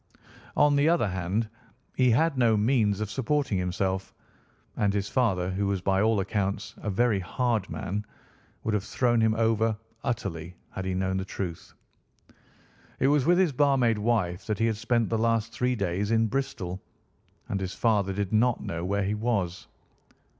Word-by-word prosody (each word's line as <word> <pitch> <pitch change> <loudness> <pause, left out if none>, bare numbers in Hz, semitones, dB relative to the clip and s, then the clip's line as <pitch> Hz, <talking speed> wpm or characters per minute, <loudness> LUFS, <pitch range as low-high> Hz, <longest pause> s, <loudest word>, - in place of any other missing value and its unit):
On 145 -1 +5
the 145 +3 +4
other 170 -9 +3
hand, 95 +5 -1 0.5
he 130 -1 +4
had 150 +6 +3
no 115 -4 +3
means 105 -2 +2
of 105 -1 -3
supporting 135 -3 0
himself, 95 +1 -2 0.6
and 100 -1 +1
his 100 -1 -1
father, 95 -8 +1
who 100 +2 -1
was 100 -1 0
by 95 +1 +2
all 110 -1 +3
accounts 100 +1 -2
a 105 - -4
very 105 +1 +2
hard 115 +1 -1
man, 100 +3 -3 0.6
would 110 - -1
have 105 -2 0
thrown 120 +2 +1
him 110 0 +3
over 110 -1 +1 0.3
utterly 90 -7 -3 0.2
had 95 - -5
he 95 0 -1
known 95 0 0
the 95 - -1
truth. 90 -3 -6 1.2
It 135 - +3
was 145 -1 +2
with 175 +1 +5
his 185 -4 +3
barmaid 130 -5 +3
wife 105 -6 0
that 110 -2 -1
he 115 - +1
had 110 -2 0
spent 115 0 +1
the 115 - 0
last 115 0 +1
three 125 0 0
days 100 0 -1
in 115 0 +3
Bristol, 100 -7 -3 0.7
and 100 - -2
his 95 -1 -4
father 105 -4 +2
did 100 +1 -3
not 120 +2 +3
know 85 0 -4
where 100 +2 0
he 100 +2 0
was. 105 -5 -1
105 Hz, 175 wpm, -27 LUFS, 95-120 Hz, 1.2 s, On